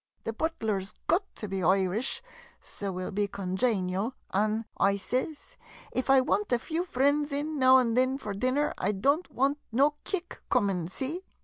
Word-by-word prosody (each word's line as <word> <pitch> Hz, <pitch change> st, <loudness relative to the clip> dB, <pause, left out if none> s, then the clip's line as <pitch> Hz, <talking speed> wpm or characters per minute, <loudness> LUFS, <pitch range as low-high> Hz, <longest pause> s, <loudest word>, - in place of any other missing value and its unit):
The 225 Hz, -, -3 dB
butler 225 Hz, -8 st, -1 dB
's 190 Hz, -, -10 dB
got 350 Hz, +5 st, +3 dB
to 210 Hz, -, -5 dB
be 195 Hz, -1 st, -3 dB
Irish, 190 Hz, -, +1 dB, 0.4 s
so 200 Hz, -, -7 dB
's -, -, -1 dB
we 185 Hz, -, -3 dB
'11 -, -, -5 dB
be 205 Hz, +1 st, +1 dB
conjaynial, 195 Hz, +2 st, -1 dB, 0.2 s
an'," 215 Hz, +3 st, +1 dB
I 200 Hz, 0 st, +3 dB
sez, 260 Hz, -, -3 dB, 0.2 s
" -, -, -17 dB
if 255 Hz, +1 st, -2 dB
I 270 Hz, -1 st, +7 dB
want 210 Hz, -3 st, 0 dB
a 245 Hz, -, +4 dB
few 320 Hz, +8 st, -2 dB
f 340 Hz, -, -13 dB
rinds 285 Hz, +2 st, +3 dB
in 295 Hz, +1 st, -2 dB
now 260 Hz, 0 st, +7 dB
an' 240 Hz, -3 st, +2 dB
thin 255 Hz, +2 st, +2 dB
for 210 Hz, -7 st, -5 dB
dinner, 255 Hz, +8 st, +1 dB
I 205 Hz, +3 st, +1 dB
don't 280 Hz, -, +1 dB
want 280 Hz, +3 st, +1 dB
no 280 Hz, +6 st, +4 dB
kick 355 Hz, -3 st, -4 dB
coomin', 185 Hz, -5 st, +1 dB
see 275 Hz, -, -4 dB
245 Hz, 195 wpm, -29 LUFS, 200-280 Hz, 0.4 s, I